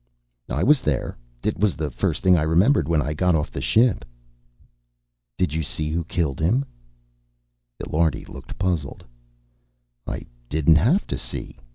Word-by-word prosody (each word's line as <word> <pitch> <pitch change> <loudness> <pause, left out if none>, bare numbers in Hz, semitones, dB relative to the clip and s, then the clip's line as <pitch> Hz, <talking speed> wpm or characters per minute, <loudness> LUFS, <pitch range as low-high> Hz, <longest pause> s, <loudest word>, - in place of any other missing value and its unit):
"I 75 +8 -1
was 145 +2 +5
there. 70 -5 -1 0.3
It - - -1
was 105 -3 +2
the 75 -2 -3
first - - -1
thing 90 -1 +6
I 80 - +2
remembered 80 - +3
when 80 -3 +2
I 75 - -2
got 90 +2 +2
off 75 -2 -1
the - - -5
ship." 115 - +3 1.3
"Did 90 -5 0
you 80 - 0
see 75 +1 -3
who 85 +1 -1
killed 80 -5 -1
him?" 110 - +2 1.2
Illiardi 80 +1 0
looked - - -10
puzzled. 90 -7 -2 1.0
"I - - -4 0.2
didn't 80 +1 +4
have 135 - +3
to - - -4
see. - - -7
80 Hz, 155 wpm, -23 LUFS, 75-95 Hz, 1.3 s, thing